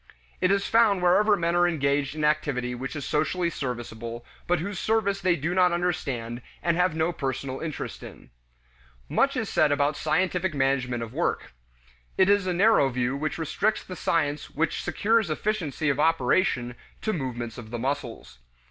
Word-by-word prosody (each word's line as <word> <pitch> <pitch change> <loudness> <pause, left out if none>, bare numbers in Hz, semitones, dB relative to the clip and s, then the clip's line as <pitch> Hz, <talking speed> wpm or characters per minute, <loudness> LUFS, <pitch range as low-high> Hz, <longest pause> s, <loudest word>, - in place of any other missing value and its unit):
It 185 - +3
is 200 0 +2
found 215 -5 +3
wherever 205 +4 +4
men 170 0 0
are 175 0 +4
engaged 140 -3 0
in 155 - -3
activity 145 -5 0
which 130 +5 -5
is 145 - -4
socially 170 +3 0
serviceable, 120 -3 -5 0.2
but 175 - +3
whose 190 +3 -4
service 205 -3 +1
they 180 -2 +3
do 165 +3 -2
not 180 -1 +4
understand 130 -9 -2 0.2
and 170 -1 +2
have 180 -2 +2
no 160 +2 0
personal 135 -2 -3
interest 160 -3 -5
in. - - -12 0.8
Much - - +1
is - - -1
said 145 - +2
about 145 +1 +1
scientific 180 +2 0
management 130 -3 0
of 115 - -8
work. - - -2 0.6
It 190 0 +4
is 200 -2 +3
a - - +1
narrow 180 -6 +4
view 125 +1 -1
which 155 +2 -2
restricts 200 +7 0
the 185 - -8
science 150 -3 -1
which 155 +1 -1
secures 220 -2 +1
efficiency 160 -3 -2
of 140 0 +1
operation 150 -4 +2 0.3
to 220 - 0
movements 120 -6 -4
of 110 -2 -10
the 120 - -4
muscles. 125 - -4
155 Hz, 170 wpm, -26 LUFS, 130-180 Hz, 0.8 s, wherever